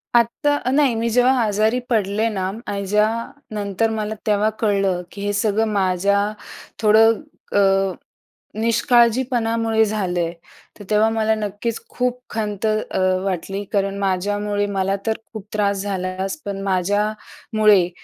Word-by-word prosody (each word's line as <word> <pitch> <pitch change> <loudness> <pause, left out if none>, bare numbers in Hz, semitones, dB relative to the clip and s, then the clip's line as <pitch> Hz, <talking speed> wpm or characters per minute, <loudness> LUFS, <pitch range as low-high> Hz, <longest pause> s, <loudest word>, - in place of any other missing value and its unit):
आत्ता 240 +5 +2
नाही, 280 -3 +3
मी 230 +1 0
जेव्हा 250 +3 +4
आजारी 215 +3 +1
पडले 215 -1 +1
ना, 190 -3 -2 0.2
आणि 200 -1 -3
ज्या 210 +2 +3 0.5
नंतर 205 +2 0
मला 215 -1 -3
तेव्हा 210 0 +3
कळलं 195 -4 +1
की 200 - -9
हे 205 0 -1
सगळं 210 +1 +1
माझ्या 195 +1 +2 0.6
थोडं 220 +1 +6 0.4
अ, 195 -1 +3 0.7
निष्काळजीपणामुळे 230 -1 +2
झालं 195 -5 -1
आहे 170 0 -1 0.5
तर 205 - -10
तेव्हा 215 +1 +4
मला 220 0 +1
नक्कीच 210 +2 -3
खूप 250 0 -2
खंत 210 -1 -2
अ, 215 -2 -1 0.3
वाटली, 195 +2 -3
कारण 200 -1 0
माझ्यामुळे 205 +2 0
मला 195 -1 0
तर 220 0 0
खूप 215 -3 -8
त्रास 200 -2 0
झालाच, 190 0 -3
पण 195 -1 -4
माझ्यामुळे 205 +1 +1
210 Hz, 130 wpm, -21 LUFS, 195-225 Hz, 0.7 s, थोडं